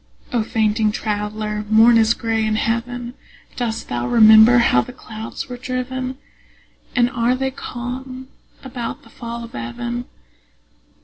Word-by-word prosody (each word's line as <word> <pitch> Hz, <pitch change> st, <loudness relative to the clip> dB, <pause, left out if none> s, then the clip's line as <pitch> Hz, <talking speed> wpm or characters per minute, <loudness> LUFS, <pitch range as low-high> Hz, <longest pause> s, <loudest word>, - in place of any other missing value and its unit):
O 240 Hz, -, +2 dB
fainting 215 Hz, -1 st, +1 dB
traveller, 210 Hz, 0 st, -3 dB
morn 225 Hz, +2 st, +6 dB
is 225 Hz, 0 st, +4 dB
gray 225 Hz, -1 st, -1 dB
in 215 Hz, 0 st, 0 dB
heaven. 235 Hz, +2 st, -2 dB, 0.4 s
Dost 235 Hz, -3 st, -3 dB
thou 120 Hz, 0 st, -2 dB
remember 220 Hz, -, +7 dB
how 235 Hz, -, +4 dB
the -, -, -8 dB
clouds 220 Hz, -3 st, -7 dB
were 250 Hz, -1 st, -7 dB
driven? 255 Hz, +1 st, -4 dB, 0.8 s
And 240 Hz, -1 st, +4 dB
are 245 Hz, 0 st, +1 dB
they 265 Hz, +1 st, -2 dB
calm 255 Hz, +1 st, -7 dB, 0.4 s
about 250 Hz, -3 st, -6 dB
the 230 Hz, -, -18 dB
fall 235 Hz, 0 st, -7 dB
of 230 Hz, -, -11 dB
even? 235 Hz, -, -4 dB
235 Hz, 135 wpm, -20 LUFS, 220-245 Hz, 0.8 s, remember